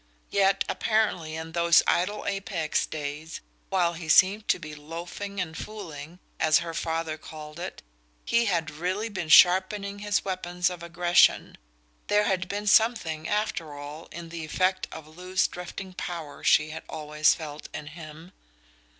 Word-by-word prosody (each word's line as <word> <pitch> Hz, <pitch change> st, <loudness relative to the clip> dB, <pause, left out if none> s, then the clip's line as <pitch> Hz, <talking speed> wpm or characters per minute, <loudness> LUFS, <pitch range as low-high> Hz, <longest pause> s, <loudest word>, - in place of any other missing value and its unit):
Yet 195 Hz, -1 st, +3 dB
apparently 205 Hz, -8 st, 0 dB
in 160 Hz, 0 st, -6 dB
those 170 Hz, 0 st, +5 dB
idle 205 Hz, +4 st, 0 dB
Apex 195 Hz, -5 st, -1 dB
days, 155 Hz, +1 st, -5 dB, 0.3 s
while 175 Hz, -3 st, +2 dB
he 165 Hz, -1 st, -8 dB
seemed 195 Hz, +6 st, +5 dB
to -, -, +3 dB
be 155 Hz, 0 st, -9 dB
"loafing 170 Hz, +6 st, -7 dB
and 160 Hz, -3 st, -3 dB
fooling," 170 Hz, -7 st, -8 dB, 0.2 s
as 155 Hz, -1 st, +5 dB
her 170 Hz, -1 st, -3 dB
father 160 Hz, -1 st, -2 dB
called 155 Hz, 0 st, -10 dB
it, 180 Hz, +2 st, -6 dB, 0.4 s
he 235 Hz, 0 st, +3 dB
had 170 Hz, -6 st, 0 dB
really 185 Hz, +8 st, -2 dB
been 180 Hz, -6 st, -5 dB
sharpening 195 Hz, +4 st, +5 dB
his 205 Hz, 0 st, 0 dB
weapons 180 Hz, -1 st, -1 dB
of 175 Hz, -1 st, -8 dB
aggression; 175 Hz, +1 st, +3 dB, 0.5 s
there 210 Hz, 0 st, +3 dB
had 185 Hz, -3 st, 0 dB
been 205 Hz, +1 st, -3 dB
something, 195 Hz, -8 st, +3 dB
after 180 Hz, -8 st, -2 dB
all, 145 Hz, +3 st, -8 dB
in 170 Hz, -1 st, -8 dB
the 165 Hz, -1 st, -6 dB
effect 185 Hz, +4 st, 0 dB
of 160 Hz, -1 st, -9 dB
loose 180 Hz, +4 st, -1 dB
drifting 185 Hz, +1 st, -8 dB
power 165 Hz, -5 st, -6 dB
she 150 Hz, +1 st, +4 dB
had 160 Hz, +1 st, -6 dB
always 150 Hz, -1 st, +2 dB
felt 150 Hz, -3 st, -8 dB
in 150 Hz, -, -6 dB
him. 155 Hz, +2 st, -11 dB
170 Hz, 150 wpm, -27 LUFS, 155-190 Hz, 0.5 s, those